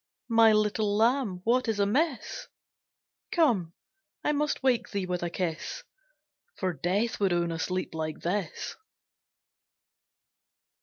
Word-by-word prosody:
My 225 Hz, -1 st, +7 dB
little 210 Hz, -1 st, +2 dB
Lamb, 225 Hz, -5 st, +2 dB
what 250 Hz, +3 st, +2 dB
is 220 Hz, -2 st, 0 dB
amiss? 270 Hz, -, 0 dB, 0.8 s
Come, 220 Hz, -, +2 dB, 0.5 s
I -, -, +2 dB
must 295 Hz, -2 st, -1 dB
wake 255 Hz, -3 st, +2 dB
thee 200 Hz, -3 st, -2 dB
with 180 Hz, -1 st, -2 dB
a 175 Hz, -, -1 dB
kiss, 170 Hz, -, -3 dB, 0.7 s
For 185 Hz, -2 st, -1 dB
Death 190 Hz, -, -1 dB
would 195 Hz, -2 st, +2 dB
own 170 Hz, -1 st, +1 dB
a 165 Hz, -, -4 dB
sleep 185 Hz, +2 st, -2 dB
like 155 Hz, -1 st, -4 dB
this. 185 Hz, +2 st, -2 dB
205 Hz, 120 wpm, -28 LUFS, 180-235 Hz, 0.8 s, My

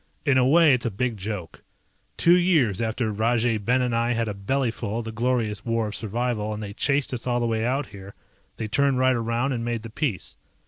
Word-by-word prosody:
In 140 Hz, -3 st, +3 dB
a 125 Hz, -, +3 dB
way 160 Hz, 0 st, +6 dB
it's 125 Hz, -1 st, 0 dB
a -, -, 0 dB
big 115 Hz, +3 st, -2 dB
joke. 100 Hz, -3 st, -6 dB, 0.6 s
Two 170 Hz, +1 st, +5 dB
years 155 Hz, -, +2 dB
after 110 Hz, 0 st, -1 dB
Rajay 115 Hz, +1 st, +1 dB
Ben 125 Hz, +5 st, +1 dB
and 125 Hz, -2 st, 0 dB
I 120 Hz, +1 st, +1 dB
had 115 Hz, -1 st, -1 dB
a 105 Hz, -, -2 dB
bellyfull 115 Hz, +1 st, -2 dB
of 120 Hz, -, -4 dB
the 110 Hz, -, -5 dB
Glorious 115 Hz, -2 st, -1 dB
War 115 Hz, -2 st, -1 dB
of 105 Hz, -, -6 dB
Survival 110 Hz, -1 st, -2 dB
and 105 Hz, -, -6 dB
they 100 Hz, -1 st, -6 dB
chased 140 Hz, +3 st, 0 dB
us 125 Hz, 0 st, -4 dB
all 120 Hz, -1 st, +1 dB
the 120 Hz, -, 0 dB
way 110 Hz, -1 st, 0 dB
out 130 Hz, +4 st, 0 dB
here, 100 Hz, -3 st, -12 dB, 0.4 s
they 110 Hz, -, -3 dB
turned 140 Hz, +4 st, +2 dB
right 130 Hz, 0 st, +3 dB
around 115 Hz, +3 st, -1 dB
and 120 Hz, -3 st, -2 dB
made 115 Hz, -2 st, -3 dB
the 115 Hz, -, -8 dB
peace. 115 Hz, -, -3 dB
115 Hz, 225 wpm, -24 LUFS, 110-125 Hz, 0.6 s, way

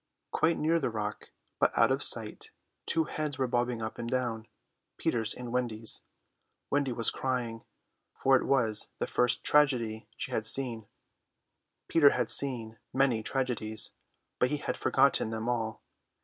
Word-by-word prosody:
Quite 165 Hz, +1 st, +2 dB
near 165 Hz, +2 st, +2 dB
the -, -, -1 dB
rock, 105 Hz, -2 st, -5 dB, 0.3 s
but -, -, +3 dB
out -, -, +5 dB
of -, -, 0 dB
sight, -, -, +2 dB, 0.4 s
two 165 Hz, -, +2 dB
heads 150 Hz, -2 st, -4 dB
were 130 Hz, -, +1 dB
bobbing 120 Hz, -1 st, -1 dB
up 110 Hz, -, -5 dB
and 120 Hz, 0 st, -4 dB
down, 120 Hz, -3 st, -2 dB, 0.5 s
Peter's 110 Hz, -2 st, 0 dB
and 125 Hz, -1 st, -4 dB
Wendy's. 115 Hz, -3 st, -1 dB, 0.7 s
Wendy 140 Hz, -2 st, +1 dB
was 115 Hz, -1 st, 0 dB
crying, 120 Hz, -3 st, -3 dB, 0.5 s
for 135 Hz, 0 st, +3 dB
it 130 Hz, -, +1 dB
was 115 Hz, -6 st, +2 dB
the -, -, -1 dB
first 125 Hz, -1 st, +1 dB
tragedy 120 Hz, -8 st, +2 dB
she -, -, -4 dB
had 110 Hz, -1 st, 0 dB
seen. 115 Hz, -3 st, +2 dB, 1.0 s
Peter 155 Hz, -4 st, +6 dB
had -, -, 0 dB
seen 115 Hz, -5 st, +1 dB
many 130 Hz, -4 st, +2 dB
tragedies, 110 Hz, -4 st, 0 dB, 0.5 s
but 125 Hz, -, +3 dB
he 150 Hz, -, -1 dB
had -, -, -3 dB
forgotten 140 Hz, -5 st, +2 dB
them 110 Hz, +1 st, -4 dB
all. 115 Hz, -2 st, -2 dB
120 Hz, 150 wpm, -30 LUFS, 110-135 Hz, 1.0 s, Peter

